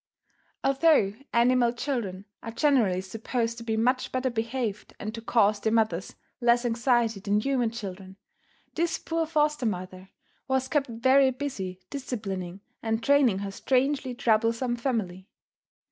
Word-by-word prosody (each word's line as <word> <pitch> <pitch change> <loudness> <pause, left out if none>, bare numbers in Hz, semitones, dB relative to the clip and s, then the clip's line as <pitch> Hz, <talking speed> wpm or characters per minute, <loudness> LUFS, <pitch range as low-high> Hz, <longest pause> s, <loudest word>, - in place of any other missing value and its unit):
Although 275 -7 +4 0.2
animal 240 0 +4
children 230 -7 -3 0.2
are 230 - -6
generally 225 -8 +2
supposed 230 +4 -3
to - - -8
be 220 -1 -1
much 255 +3 +1
better 255 0 -1
behaved 230 -2 -3
and 215 +1 -5
to 230 - -6
cause 215 -3 +3
their 220 +2 0
mothers 215 -6 0 0.2
less 240 0 +3
anxiety 235 -2 +1
than 205 +1 +1
human 250 0 +1
children, 195 -4 -8 0.6
this 335 0 0
poor 325 -1 -2
foster 300 -5 +1
mother 185 -1 -5 0.4
was 265 0 +1
kept 290 -1 +1
very 260 +4 +4
busy 245 -9 -4
disciplining 195 -9 -5 0.2
and 225 0 -1
training 275 -6 +4
her 195 - -4
strangely 265 +3 0
troublesome 230 0 +1
family. 215 -7 -3
235 Hz, 135 wpm, -27 LUFS, 210-260 Hz, 0.6 s, Although